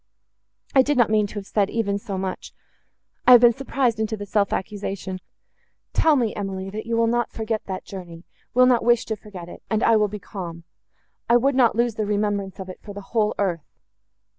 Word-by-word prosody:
I 265 - +7
did 290 +1 0
not 235 -3 +4
mean 215 -1 +3
to 200 - -13
have 205 -1 -5
said 200 -1 +1
even 200 -3 -1
so 200 -1 -5
much—I 190 +5 -2
have 245 - +9
been 240 -1 +7
surprised 255 -2 -1
into 220 0 -1
the 205 - -6
self 200 0 +1
accusation. 195 -1 -4 0.7
Tell 315 -2 +4
me, 235 -5 +1
Emily, 195 -1 -4
that 215 +2 -6
you 230 0 0
will 230 - +3
not 240 0 +1
forget 220 -1 -3
that 190 -1 -5
journey—will 185 +7 -2
not 250 -2 +3
wish 240 0 +3
to 220 - -2
forget 195 -4 -10
it, - - -11
and 220 +1 0
I 230 - +5
will 210 -1 +3
be 210 +1 -6
calm. 175 -4 -8 0.7
I 240 - +7
would 270 +3 +2
not 250 -4 +4
lose 235 0 +1
the 215 -1 -2
remembrance 205 -2 -1
of 190 - -6
it 185 - -9
for 205 -1 -10
the 205 - -6
whole 215 -2 +2
earth." 175 -6 -2
210 Hz, 205 wpm, -23 LUFS, 195-235 Hz, 0.7 s, have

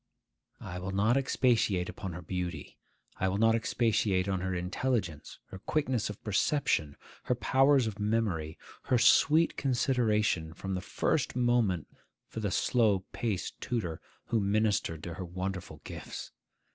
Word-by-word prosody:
I 90 -1 -6
will 95 +1 -4
not 105 +5 +3
expatiate 120 -8 +2
upon 95 -2 -6
her 90 +2 -7
beauty; 90 +1 -5 0.4
I 95 - 0
will 95 - -1
not 115 +1 +4
expatiate 110 -4 +1
upon 95 -2 -1
her 95 0 -2
intelligence, 90 - -2
her 95 - -8
quickness 130 -3 -1
of 105 - -8
perception, 100 - +1 0.3
her 125 - +1
powers 135 +1 +4
of 105 -2 -4
memory, 105 -8 -1 0.3
her 125 - +3
sweet 150 +7 +5
consideration, 110 - +1
from 95 +2 -4
the 90 - -2
first - - -1
moment, 120 -9 +2 0.4
for - - -6
the 105 -2 -1
slow 105 -3 +2
paced 105 -6 -3
tutor 105 -11 -3 0.3
who 115 - +2
ministered 100 -6 0
to 85 - -5
her 90 - -6
wonderful 90 +1 -5
gifts. - - -7
105 Hz, 145 wpm, -30 LUFS, 90-120 Hz, 0.4 s, sweet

